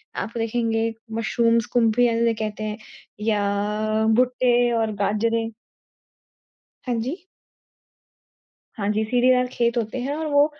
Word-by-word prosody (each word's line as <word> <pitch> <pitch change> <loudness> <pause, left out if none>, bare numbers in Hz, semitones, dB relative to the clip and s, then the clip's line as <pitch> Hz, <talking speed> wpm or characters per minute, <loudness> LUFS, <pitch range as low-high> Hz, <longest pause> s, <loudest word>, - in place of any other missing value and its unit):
आप 225 - -4
देखेंगे 225 0 0 0.2
मशरूम्स, 230 +1 +2
कुम्फियाँ 235 0 +3
जिन्हे 230 0 +2
कहते 215 -1 -4
हैं 215 0 -3 0.5
या 210 +1 0
भुट्टे 245 -1 +3
और 225 -1 0
बाजरे। 225 +2 0 1.4
हाँ 245 - 0
जी। 320 +10 -5 1.5
हाँ 200 - -2
जी, 215 +1 0
सीढ़ीदार 250 +2 +3
खेत 235 0 +1
होते 225 +2 -2
हैं 275 +3 -2
और 320 +1 -3
वो 285 0 +5
230 Hz, 120 wpm, -23 LUFS, 215-245 Hz, 1.5 s, वो